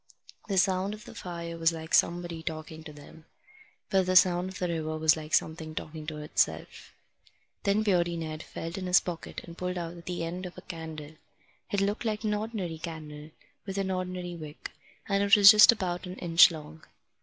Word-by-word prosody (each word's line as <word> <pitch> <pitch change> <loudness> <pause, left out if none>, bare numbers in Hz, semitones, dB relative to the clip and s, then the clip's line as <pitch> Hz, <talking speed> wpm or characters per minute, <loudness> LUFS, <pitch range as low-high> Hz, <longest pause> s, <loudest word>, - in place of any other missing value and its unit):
The 195 -2 -1
sound 190 +2 +2
of 215 - -14
the - - -11
fire 170 -2 -6
was 165 0 +3
like 160 -1 -8
somebody 170 -1 +1
talking 160 -1 -6
to 155 - -8
them. 150 +2 -14 0.7
But 190 -2 +2
the 185 - +1
sound 180 0 +5
of 190 - -9
the 180 - -1
river 155 -2 -3
was 155 0 +4
like 155 -1 -1
something 160 -1 -2
talking 155 0 -7
to 155 -1 -5
itself. 150 0 -2 0.7
Then 205 +2 +2
Beardy 175 -4 +1
Ned 160 -1 -5
felt 165 +3 -6
in 185 - -5
his 180 +1 +6
pocket 170 -2 -6
and 170 - -11
pulled 180 0 -3
out 170 0 -6
the 180 -2 -3
end 180 +3 -4
of 180 - -13
a - - -8
candle. 160 -3 -8 0.6
It 200 - +1
looked 205 +2 -1
like 220 -1 -2
an 210 -1 0
ordinary 205 -6 -4
candle, 155 -2 -8 0.4
with 195 0 -4
an 195 -1 -1
ordinary 180 -1 -4
wick, 155 -2 -9 0.4
and 200 -1 +1
it 200 +1 +6
was 200 -1 +10
just 215 +1 +9
about 185 -5 -3
an 180 - -7
inch 170 -1 +6
long. 155 -1 -10
175 Hz, 195 wpm, -28 LUFS, 160-190 Hz, 0.7 s, was